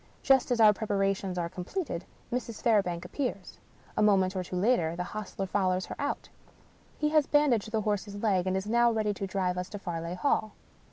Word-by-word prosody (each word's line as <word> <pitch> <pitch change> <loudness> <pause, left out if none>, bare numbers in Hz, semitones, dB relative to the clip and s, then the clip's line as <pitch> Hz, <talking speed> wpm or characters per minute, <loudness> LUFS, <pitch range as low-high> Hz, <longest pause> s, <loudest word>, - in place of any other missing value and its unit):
Just 265 -1 +4
as 245 -2 +1
our 215 -2 +8
preparations 195 -3 -1
are 170 -1 -1
completed, 180 - -4 0.3
Mrs. 235 -3 -3
Fairbank 180 -7 +2
appears. 200 -2 -4 0.4
A - - +1
moment 195 -3 +3
or 185 - -1
two 180 - -6
later 180 -5 +2
the 180 - -2
hostler 200 0 -5
fol 190 0 +1
lows 185 0 0
her - - -7
out. 285 0 -2 0.7
He 300 - +1
has 305 -2 +3
bandaged 255 -8 +2
the 220 -1 +1
horse's 205 -1 -2
leg, 200 -3 +1
and 185 0 +1
is 190 - -3
now 235 +2 +3
ready 215 -2 0
to 195 0 -4
drive 185 -2 -1
us 180 +1 -5
to 205 - -6
Farleigh 170 -3 -4
Hall. 215 -5 +1
200 Hz, 200 wpm, -29 LUFS, 185-225 Hz, 0.7 s, our